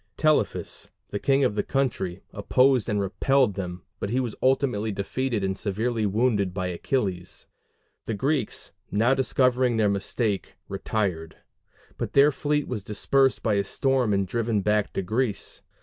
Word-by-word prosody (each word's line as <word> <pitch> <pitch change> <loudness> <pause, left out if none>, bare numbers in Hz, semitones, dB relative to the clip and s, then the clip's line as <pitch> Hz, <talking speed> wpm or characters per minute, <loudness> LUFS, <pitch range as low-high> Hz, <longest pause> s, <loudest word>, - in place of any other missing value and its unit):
Telephus, 155 -1 0 0.2
the 100 - -3
king 135 +3 +3
of 125 - +2
the 105 - 0
country, 105 -9 -2
opposed 125 +4 +3
and 105 -1 +1
repelled 115 +4 +2
them, 90 -2 -5 0.2
but 100 - -3
was 120 -1 -1
ultimately 130 -5 +1
defeated 110 +3 -2
and 95 0 0
severely 110 +3 -1
wounded 100 -3 +1
by 95 -2 -1
Achilles. 90 -1 -2 0.6
The 110 - -2
Greeks, 135 +1 -1 0.2
now 115 +5 +3
discovering 125 -2 +2
their 105 -2 +3
mistake, 100 +1 -2
retired; 90 -7 -2 0.6
but - - -3
their 140 +2 +6
fleet 150 +1 -1
was 110 -6 -4
dispersed 130 +6 +1
by 110 - +2
a 100 0 +2
storm 130 +1 +1
and 100 -1 +2
driven 115 0 0
back 105 +1 +1
to 95 - -1
Greece. 110 +3 -1
110 Hz, 150 wpm, -26 LUFS, 100-130 Hz, 0.6 s, their